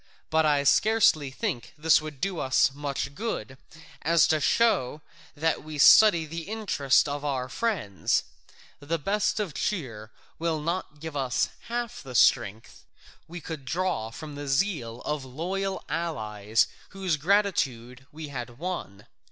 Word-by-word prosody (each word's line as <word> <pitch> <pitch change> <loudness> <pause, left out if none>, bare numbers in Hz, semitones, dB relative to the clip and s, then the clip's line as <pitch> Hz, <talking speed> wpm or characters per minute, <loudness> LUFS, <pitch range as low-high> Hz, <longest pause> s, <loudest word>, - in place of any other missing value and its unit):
But 160 0 +3
I 145 -1 +2
scarcely 160 - +4
think 125 -2 -4
this 160 +1 +4
would 155 -3 -8
do 185 +1 -2
us 130 0 0
so 135 - +4
much 140 -1 -4
good 140 - -4 0.5
as 165 0 +4
to 155 0 +3
show 150 - +2 0.3
that 160 +2 0
we 155 0 -7
study 170 +2 +7
the 165 +3 -7
interest 190 -12 +2
of 145 0 -4
our 135 -3 -2
friends: 160 - -1 0.6
the 160 +4 -2
best 205 +7 0
of 200 -7 -2
cheer 115 - -3 0.3
will 165 -1 0
not 165 -1 -3
give 160 -1 -7
us 130 -4 0 0.2
half 240 0 -4
the 130 -3 -9
strength 110 0 +2 0.4
we 175 +2 -7
could 155 -4 -7
draw 170 -6 -1
from 150 +6 -9
the 145 0 -7
zeal 135 - -1
of 150 -2 -3
loyal 185 +9 -3
allies 110 -10 0 0.2
whose 190 -4 -1
gratitude 140 - 0
we 155 0 -8
had 120 -3 -7
won. 145 - -5
150 Hz, 145 wpm, -27 LUFS, 130-180 Hz, 0.6 s, study